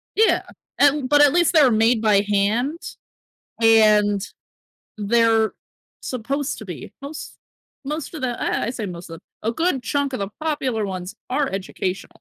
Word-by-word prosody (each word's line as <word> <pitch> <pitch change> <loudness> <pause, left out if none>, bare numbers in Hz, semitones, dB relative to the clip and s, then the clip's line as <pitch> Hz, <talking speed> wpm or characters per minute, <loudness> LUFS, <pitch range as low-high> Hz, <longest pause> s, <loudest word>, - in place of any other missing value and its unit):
Yeah, 440 +1 +3 0.4
and 285 -1 +3
but 290 0 +5
at 290 -1 +6
least 345 0 +3
they're 290 -6 +6
made 225 +1 +3
by 210 -3 +4
hand, 210 +10 0 0.8
and 210 -3 +4 0.7
they're 225 +1 +2 0.5
supposed 270 +3 -3
to 220 - -9
be 180 -5 -8
most 290 +2 -8 0.5
most 300 +4 -5
of 310 - -7
the 245 -2 -2
I - - -1
I - - -1
say 230 -4 -5
most 175 -2 -8
of 165 +1 -9 0.2
a 225 - -1
good 320 -1 0
chunk 285 +1 -1
of - - -3
the 200 -1 -3
popular 270 -8 -1
ones 185 -1 -6 0.2
are 275 +2 +1
educational. 190 -1 -4
230 Hz, 155 wpm, -22 LUFS, 205-285 Hz, 0.8 s, at